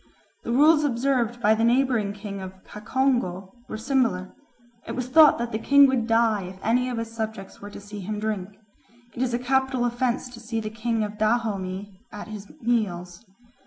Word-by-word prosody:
The - - -3
rules 300 +4 +5
observed 245 -3 0
by 215 -1 +5
the 220 +1 0
neighbouring 240 -3 +2
king 200 -1 -7
of 190 0 -10
Cacongo 210 -5 -1 0.2
were - - -4
similar; 230 -6 0 0.5
it - - -4
was 255 -1 -3
thought 305 +3 +7
that 235 0 -3
the 220 - -2
king 280 +4 +6
would 260 -4 +1
die 225 -2 +3
if 185 +1 -9
any 250 +3 +2
of 245 - -3
his 230 0 -5
subjects 220 -3 -6
were 205 - -8
to - - -10
see 205 +1 -9
him 205 +2 -4
drink. 210 -2 -4 0.6
It 240 - -5
is 245 -2 0
a - - +1
capital 260 0 +1
offence 245 +1 -1
to 245 -2 -11
see 225 0 -4
the 215 -1 -5
king 225 0 -1
of 210 0 -6
Dahomey 205 -4 -1
at 210 0 -8
his 210 -2 -8
meals. 195 -5 -1
225 Hz, 190 wpm, -25 LUFS, 205-245 Hz, 0.6 s, thought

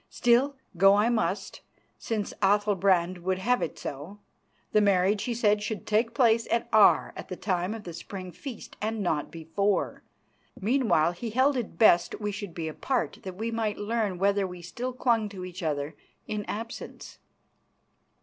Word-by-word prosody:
Still, 245 +4 +3 0.2
go 195 +2 +7
I 210 +3 +3
must, 230 -2 -1 0.4
since 215 -3 -3
Athalbrand 195 -3 +2
would 185 +1 -1
have 245 +6 +1
it - - -3
so. 150 +9 -7 0.5
The 215 - +4
marriage, 200 0 +2
he 240 - -2
said, 210 -2 +2
should 210 -1 -4
take 230 +2 +1
place 230 -2 +3
at 235 0 0
Aar 215 -2 +5
at - - -8
the 185 - -5
time 185 +2 -1
of 220 - -8
the 175 - -7
Spring 185 +2 -7
feast, 255 - -9
and 215 0 -2
not 155 -5 -1
before. 170 +5 -1 0.6
Meanwhile 215 - +2
he 225 +7 -6
held 260 +5 +3
it 245 -4 -4
best 215 -6 +4
we 210 -1 -2
should 200 -4 -7
be 165 -2 -3
apart 255 - -2
that 185 -1 -7
we 225 +2 -2
might 220 -2 -1
learn 210 -3 -1
whether 200 +1 +2
we 180 -1 -9
still 245 +9 -4
clung 235 -4 +1
to 190 -3 -7
each 180 0 -8
other 150 -1 -2 0.3
in 210 -1 -4
absence. 230 +2 -7
205 Hz, 170 wpm, -28 LUFS, 180-230 Hz, 0.6 s, go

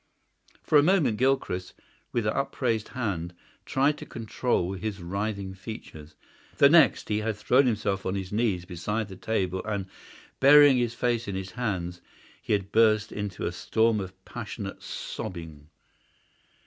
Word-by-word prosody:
For 150 - +5
a - - +6
moment 150 - +3
Gilchrist, 125 -8 0 0.4
with 115 -3 -1
upraised 115 -1 -1
hand, 95 -9 -3 0.3
tried 140 +3 +2
to - - -8
control 110 -4 -1
his 100 +1 -4
writhing 100 +2 -3
features. 95 -7 -10 0.4
The 140 - +7
next 165 -1 +5
he 105 0 +1
had 110 0 -2
thrown 125 +6 +3
himself 100 -4 -1
on 95 - -1
his 95 -1 -4
knees 105 -5 0
beside 105 +5 -3
the 95 - -8
table 95 -2 -2
and, 100 -2 -3 0.5
burying 145 0 +8
his 120 -1 0
face 120 -2 0
in 100 - -3
his 95 0 -5
hands, 90 -8 -3 0.4
he - - -1
had 100 -1 -1
burst 110 -1 +3
into 105 -3 -4
a - - -1
storm 110 -1 +1
of 95 -1 -8
passionate - - -7
sobbing. 80 -4 -7
105 Hz, 150 wpm, -27 LUFS, 95-120 Hz, 0.5 s, burying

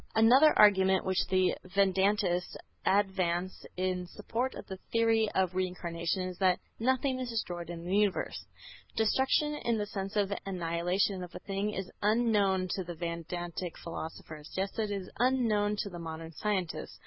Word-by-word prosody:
Another 250 +8 +6
argument 190 -2 +5
which 190 0 +1
the 185 -1 +3 0.2
Vedantists 195 -2 +2 0.3
advance 185 -2 +1
in 180 -1 -1
support 230 +7 -3
of - - -8
the 190 - -7
theory 225 -1 +3
of 185 -1 +2
Reincarnation 180 -1 -2
is 185 -1 -6
that 185 -2 +4 0.2
"Nothing 260 +2 +1
is 255 -1 -3
destroyed 175 -7 -3
in 170 -1 -6
the 185 +2 0
universe." 205 -2 0 0.5
Destruction 265 +6 +2
in 235 -5 0
the 210 - -1
sense 195 -1 -5
of 205 -2 +2
the 200 - -2
annihilation 180 +1 0
of 175 - -10
a - - -5
thing 195 +1 -1
is 190 -1 -4
unknown 205 -4 +2
to 190 - -1
the 175 -1 -7
Vedantic 170 +1 -4
philosophers, 160 -2 -8
just 195 +4 -2
as 215 -1 0
it - - -4
is - - -13
unknown 230 -5 +2
to 200 - -4
the 175 - -7
modern 165 0 -6
scientists. 185 0 -3
190 Hz, 160 wpm, -31 LUFS, 175-210 Hz, 0.5 s, Another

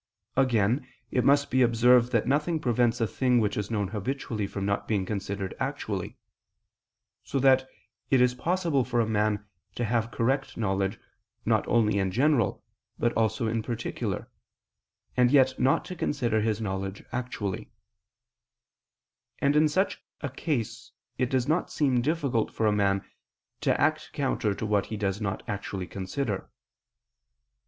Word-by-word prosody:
Again, 125 -1 +2 0.2
it 125 - +2
must 140 +2 +3
be 130 +1 +3
observed 120 +1 +5
that 115 -3 +2
nothing 150 +5 +1
prevents 120 -2 +1
a 115 - +2
thing 125 +2 +2
which 105 -2 0
is 105 -1 -3
known 105 -4 -1
habitually 110 -1 -3
from 100 0 -4
not 100 0 -1
being 100 -4 0
considered 100 -1 -3
actually: - - -3 1.1
so - - -3
that 130 0 +4 0.4
it 135 - +4
is 125 0 +4
possible 165 0 +1
for 120 -1 -1
a 115 - +3
man 105 -1 0 0.3
to 120 - -1
have 115 0 0
correct 135 +4 -1
knowledge 95 -2 0 0.5
not - - +2
only 105 -3 +3
in 95 -1 +1
general 125 +1 +2 0.3
but 120 - +1
also 110 0 +1
in 110 0 0
particular, 115 0 -3 0.9
and 125 -1 +4
yet 130 -1 +4
not 130 - +3
to 180 - -6
consider 120 -9 0
his 110 0 0
knowledge 95 -2 -4
actually: 110 -4 -4 1.7
and 140 0 +2
in 155 0 +5
such 190 +6 0 0.2
a 140 - -3
case 135 -5 -3 0.3
it 125 -2 +1
does 130 -2 +1
not 160 +4 +1
seem 135 -5 +2
difficult 140 -5 0
for 110 - -1
a 105 - +4
man 100 -1 +1 0.5
to - - +1
act - - +1
counter 105 -2 0
to 110 - -4
what 105 -2 +1
he 110 - -4
does 100 0 -1
not 100 -2 -2
actually 100 -3 -4
consider. 95 +4 -3
115 Hz, 150 wpm, -27 LUFS, 105-130 Hz, 1.7 s, observed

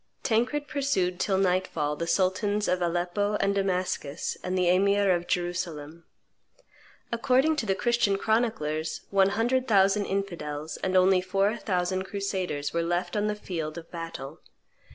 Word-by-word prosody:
Tancred 250 +6 0
pursued 230 -11 0
till 195 -2 +1
nightfall 180 -5 0
the 170 +3 -4
sultans 200 +3 +1
of 180 0 +1
Aleppo 175 +4 0
and 200 -1 +1
Damascus 185 -6 -1
and 185 +1 -1
the 180 -1 +2
emir 200 +2 +3
of 175 -1 0
Jerusalem. 170 -3 -3 1.1
According 260 +6 +2
to 225 - -2
the 195 - +2
Christian 235 -3 +1
chroniclers, 195 -9 -1
one 195 -1 +4
hundred 245 +5 0
thousand 200 -1 +3
infidels, 160 -6 -4
and 185 0 0
only 185 0 +5
four 195 +3 +1
thousand 185 -3 -1
crusaders, 190 -7 -3
were 170 - +1
left 175 +2 -1
on 210 0 +1
the 210 - -1
field 165 -6 -5
of 165 -1 -10
battle. 165 -3 -7
190 Hz, 145 wpm, -27 LUFS, 175-205 Hz, 1.1 s, only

